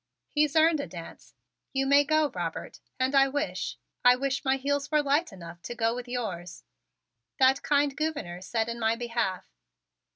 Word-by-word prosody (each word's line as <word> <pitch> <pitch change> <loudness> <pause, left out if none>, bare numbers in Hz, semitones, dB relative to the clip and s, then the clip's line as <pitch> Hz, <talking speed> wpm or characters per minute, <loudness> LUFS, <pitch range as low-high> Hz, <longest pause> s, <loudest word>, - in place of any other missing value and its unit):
He's 300 -1 +1
earned 320 0 +5
a 280 - -3
dance. 170 -2 -11 0.4
You 270 0 +1
may 280 +1 +5
go, 310 0 +2
Robert, 170 -3 -5 0.2
and 260 +2 +1
I 275 -1 +6
wish 290 +3 -3 0.3
I 245 0 +7
wish 275 +2 -2
my 265 -1 +2
heels 285 +1 -1
were 300 -1 +2
light 290 +3 +1
enough 170 -2 -11
to 240 - -6
go 230 -1 +1
with 250 0 -6
yours," 185 -8 -5 0.7
that 265 0 +4
kind 285 -1 +2
Gouverneur 285 - -3
said 220 +4 -1
in 235 0 -4
my 225 0 +2
behalf. 230 -6 -2
265 Hz, 170 wpm, -28 LUFS, 225-285 Hz, 0.7 s, I